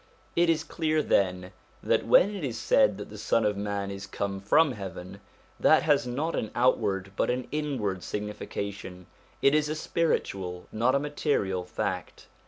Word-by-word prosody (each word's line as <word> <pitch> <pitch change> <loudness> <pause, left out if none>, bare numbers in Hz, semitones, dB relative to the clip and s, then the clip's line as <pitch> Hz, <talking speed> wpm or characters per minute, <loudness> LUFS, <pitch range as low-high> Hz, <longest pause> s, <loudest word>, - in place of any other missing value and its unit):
It 170 0 +3
is 165 -1 +2
clear, 155 -1 0
then, 90 -4 +1 0.3
that - - +1
when 205 +3 +5
it 195 -5 -5
is 125 -5 -3
said - - +3
that - - -8
the - - -9
Son 115 - +1
of 105 -1 +1
man 100 -1 -3
is 100 0 -7
come 100 0 -3
from 150 +9 +4
heaven, 95 -4 -8 0.4
this - - +5
has 125 - +2
not 145 +7 -2
an 110 - -2
outward 105 -6 +1
but - - 0
an 125 +1 -1
inward 130 -11 -2
signification; 100 -3 -5 0.4
it 140 - +5
is 150 -1 +2
a 155 - -1
spiritual, 95 - -1
not 120 +4 +2
a - - +3
material, 140 - -1
fact. 90 - -4
110 Hz, 170 wpm, -28 LUFS, 100-150 Hz, 0.4 s, when